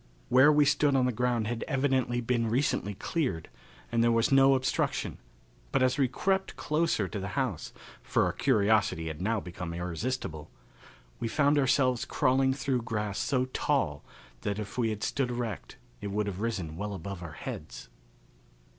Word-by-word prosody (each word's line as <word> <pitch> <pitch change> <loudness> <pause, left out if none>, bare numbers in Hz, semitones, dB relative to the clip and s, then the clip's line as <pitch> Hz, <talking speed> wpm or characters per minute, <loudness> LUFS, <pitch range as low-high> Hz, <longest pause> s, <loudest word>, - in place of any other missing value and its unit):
Where 130 +4 +7
we 150 -1 +5
stood 145 0 +3
the 125 -1 +3
ground 120 -1 0
had 115 +1 -3
evidently 130 -4 +1
been 115 -1 0
recently 115 -5 0
cleared, 105 - -2 0.4
and 115 - +2
there 120 - +4
was 115 +2 +2
no 135 0 +6
obstruction, 130 0 -1 0.5
but - - +2
as 130 +2 +2
we 135 - +4
crept 190 +9 -1
closer 155 - 0
to 100 - -5
the 95 - -4
house 125 - -2 0.3
for - - +1
our - - -1
curiosity 100 -6 +2
had 80 +1 -7
now 110 +3 +1
become 90 -2 -6
irresistible 85 -1 -4 0.7
we 115 - -2
found 145 +4 +3
ourselves 130 -2 +2
crawling 130 +1 +2
through 135 -2 -1
grass 105 -3 -3
so 130 -2 +1
tall 130 - -1 0.4
that 100 +6 -2
if 105 -2 -6
we 120 -3 +1
had 105 0 -4
stood 135 +1 0
erect 120 -2 -4 0.2
it 105 - -4
would 105 +1 -1
have 100 -1 -4
risen 95 -9 -3
well 105 +1 -4
above 95 +1 -6
our 85 -3 -7
heads. 75 -3 -7
115 Hz, 165 wpm, -29 LUFS, 100-130 Hz, 0.7 s, Where